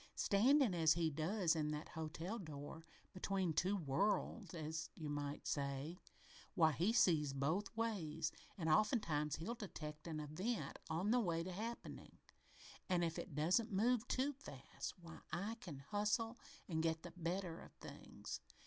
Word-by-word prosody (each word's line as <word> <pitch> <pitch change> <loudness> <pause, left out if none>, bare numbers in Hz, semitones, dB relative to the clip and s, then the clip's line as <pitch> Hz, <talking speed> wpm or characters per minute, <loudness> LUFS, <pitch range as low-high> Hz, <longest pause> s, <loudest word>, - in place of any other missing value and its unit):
"Standing 245 +3 +5
as 160 -2 +5
he 165 -1 +1
does, 165 +3 +2
in 150 -1 +1
that 150 +1 -3
hotel 160 +7 -4
door 155 -1 -7 0.3
between 185 -2 0
two 190 +6 +2
worlds, 185 +4 0
as 160 0 -3
you 155 -3 -4
might 145 0 -3
say 140 +4 -2 0.6
why, 160 -4 +6
he 175 +9 +2
sees 155 - +4
both 155 +9 +1
ways, 180 -9 0 0.3
and 165 -4 -1
oftentimes 155 - +3
he'll 190 +9 -3
detect 155 -9 -6
an 155 -2 -2
event 185 +10 -2
on 175 +6 +1
the 250 - +5
way 170 -6 +1
to 185 - -4
happening, 225 +6 -5 0.7
an' 180 -2 +3
if 165 -1 0
it - - -6
don't 180 +10 +3
move 230 +4 +3
too 275 +3 +1
fast, 280 +3 -7
why, 165 -1 -10
I 200 +8 -2
can 160 -7 -6
hustle 210 - 0 0.3
an' 160 -3 0
get 160 0 +1
the 175 - -7
better 175 0 -2
of - - -12
things." - - -7
170 Hz, 155 wpm, -41 LUFS, 155-205 Hz, 0.7 s, why